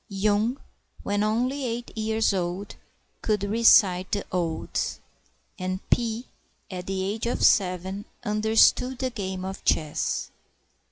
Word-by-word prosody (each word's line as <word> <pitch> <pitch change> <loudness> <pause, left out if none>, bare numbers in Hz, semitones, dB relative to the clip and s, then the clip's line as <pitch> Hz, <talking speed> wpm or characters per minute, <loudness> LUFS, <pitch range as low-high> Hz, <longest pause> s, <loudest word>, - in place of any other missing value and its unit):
Yung, 210 +5 +1 0.5
when 205 0 0
only 250 +6 0
eight 240 -1 -4
years 220 -1 +1
old, 185 +2 -3 0.5
could 210 -2 0
recite 200 -4 +5
the 205 -2 -1
Odes; 170 -3 -2 0.6
And 185 0 -2
Pi, 230 0 +1 0.5
at 180 -1 -6
the 190 -1 -2
age 215 +4 -2
of 240 - +1
seven, 190 +1 +2 0.2
understood 220 +4 +3
the 260 0 -2
game 190 -4 -4
of 190 0 -6
chess. 155 -2 0
205 Hz, 120 wpm, -26 LUFS, 185-225 Hz, 0.6 s, recite